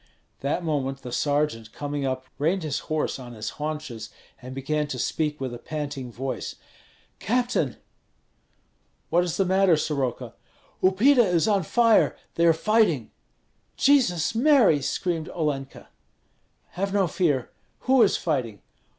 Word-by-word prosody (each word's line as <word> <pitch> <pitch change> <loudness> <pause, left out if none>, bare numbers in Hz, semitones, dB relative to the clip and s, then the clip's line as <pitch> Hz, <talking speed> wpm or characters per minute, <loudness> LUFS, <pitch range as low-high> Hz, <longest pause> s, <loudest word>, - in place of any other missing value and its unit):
That 145 +6 -1
moment 135 -4 -2
the 125 - -7
sergeant 145 -5 -1
coming 145 -1 -3
up, 130 0 -3
reined 170 +5 +1
his 150 -3 -2
horse 155 -3 -1
on 120 -2 -9
his 110 -1 -5
haunches, 150 -8 -5 0.3
and 130 +1 -8
began 150 +2 -1
to 140 -3 -5
speak 150 +4 -1
with 130 -2 -4
a 120 - -7
panting 145 -3 -5
voice: 130 +1 -4 0.6
"Captain! 245 +3 0 0.7
" - - -43
"What 175 +1 +4
is 175 -3 -3
the 195 - +2
matter, 190 -2 +4
Soroka?" 140 -5 -2 0.5
"Upita 240 +8 +5
is 180 -1 +2
on 205 -2 +3
fire; 230 +6 +3 0.2
they 170 0 +3
are - - +7
fighting!" 165 - +2 0.7
"Jesus 230 - +3
Mary!" 230 - +4
screamed 165 +3 -2
Olenka. 145 -5 -3 0.8
"Have 195 +2 -3
no 195 -2 +3
fear! 150 -7 0 0.3
Who 260 0 +4
is 210 - +4
fighting?" 125 - -2
155 Hz, 140 wpm, -25 LUFS, 135-190 Hz, 0.8 s, are